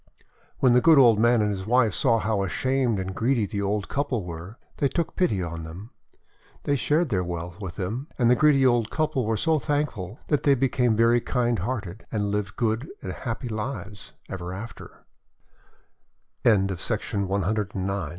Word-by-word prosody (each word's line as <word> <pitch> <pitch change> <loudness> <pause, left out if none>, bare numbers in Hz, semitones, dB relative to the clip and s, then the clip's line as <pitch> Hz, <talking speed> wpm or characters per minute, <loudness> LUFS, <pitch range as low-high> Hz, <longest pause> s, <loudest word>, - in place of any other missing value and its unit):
When 130 -2 +4
the 125 - +5
good 160 +1 +6
old 120 -6 +6
man 120 0 +4
and 105 - +1
his 95 0 -5
wife 115 -3 +3
saw 115 +2 +2
how 110 -2 0
ashamed 125 +4 0
the 95 - -2
greedy 110 +1 -1
old 100 0 -1
couple 130 -8 -2
were, 85 +6 -8 0.2
they 140 - +2
took 170 +4 -2
pity 105 - +1
on 85 -1 -5
them. 90 +8 -9 0.7
They 145 - +1
shared 150 +4 +1
their 95 -5 0
wealth 85 +2 -6
with 90 -3 -6
them; 115 +10 -4
and 120 - +3
the 125 - +5
greedy 140 -1 +4
old 120 -3 +3
couple 155 -7 -1
were 110 -1 +1
so 160 +3 +2
thank 145 +4 0
ful 95 +2 -8
that 150 - +2
they 140 -1 +4
became 125 -3 +1
very 115 +2 +4
kind 120 -2 0
hearted, 110 -6 -4
and 105 -2 -1
lived 100 -1 -2
good 115 +3 -1
and 95 - -4
happy 125 +3 -5
lives 110 -2 -6
115 Hz, 160 wpm, -25 LUFS, 100-130 Hz, 0.7 s, good